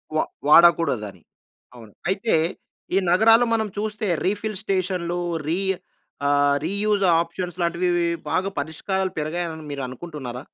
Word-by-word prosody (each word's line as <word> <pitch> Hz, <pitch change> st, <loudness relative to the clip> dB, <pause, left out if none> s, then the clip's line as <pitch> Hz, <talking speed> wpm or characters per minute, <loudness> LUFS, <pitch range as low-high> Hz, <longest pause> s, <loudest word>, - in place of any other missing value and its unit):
వా 155 Hz, -, +3 dB, 0.2 s
వాడకూడదని. 140 Hz, -, +4 dB, 0.5 s
అవును. 115 Hz, -3 st, -13 dB, 0.2 s
అయితే, 195 Hz, +4 st, 0 dB, 0.6 s
ఈ -, -, +4 dB
నగరాలు 225 Hz, +6 st, +6 dB
మనం 220 Hz, -1 st, +1 dB
చూస్తే 215 Hz, 0 st, -2 dB, 0.2 s
రీఫిల్ 205 Hz, +1 st, -1 dB
స్టేషన్‌లు 180 Hz, -3 st, -1 dB, 0.3 s
రి 170 Hz, +4 st, 0 dB, 0.7 s
ఆహ్, 145 Hz, 0 st, +3 dB
రీయూజ్ 200 Hz, +2 st, 0 dB, 0.2 s
ఆప్షన్స్ 175 Hz, +1 st, -5 dB
లాంటివి 170 Hz, +1 st, 0 dB
వి 175 Hz, -, +1 dB, 0.3 s
బాగా 190 Hz, +2 st, +1 dB
పరిష్కారాలు 185 Hz, +5 st, -2 dB
పెరిగాయని 160 Hz, 0 st, -3 dB
మీరు 140 Hz, -, -4 dB
అనుకుంటున్నారా? 130 Hz, -3 st, -7 dB
175 Hz, 120 wpm, -23 LUFS, 150-195 Hz, 0.7 s, నగరాలు